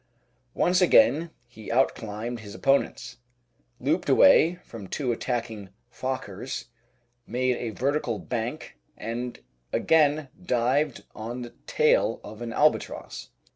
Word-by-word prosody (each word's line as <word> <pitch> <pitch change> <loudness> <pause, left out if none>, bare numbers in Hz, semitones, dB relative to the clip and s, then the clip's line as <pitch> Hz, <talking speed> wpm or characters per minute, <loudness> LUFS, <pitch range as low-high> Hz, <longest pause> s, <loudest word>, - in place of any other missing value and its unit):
Once 180 +1 +3
again 170 -2 +5 0.2
he 115 -3 -10
out 130 +3 +3
climbed 110 +2 -5
his 105 -1 -10
opponents, 130 -2 0 0.6
looped - - 0
away 170 +3 +6
from 110 -5 -9
two 130 +4 -1
attacking 115 -4 -3 0.2
Fokkers, 125 -2 -4 0.6
made 125 +1 0
a 120 - -3
vertical 130 0 -1
bank, 115 - -5 0.2
and 120 +2 -5 0.3
again 150 -2 +3
dived 130 0 +1
on 120 +3 -6
the 120 0 -10
tail - - +3
of 105 +2 -10
an 120 -1 -4
Albatross. 150 +5 0
120 Hz, 115 wpm, -26 LUFS, 115-135 Hz, 0.6 s, away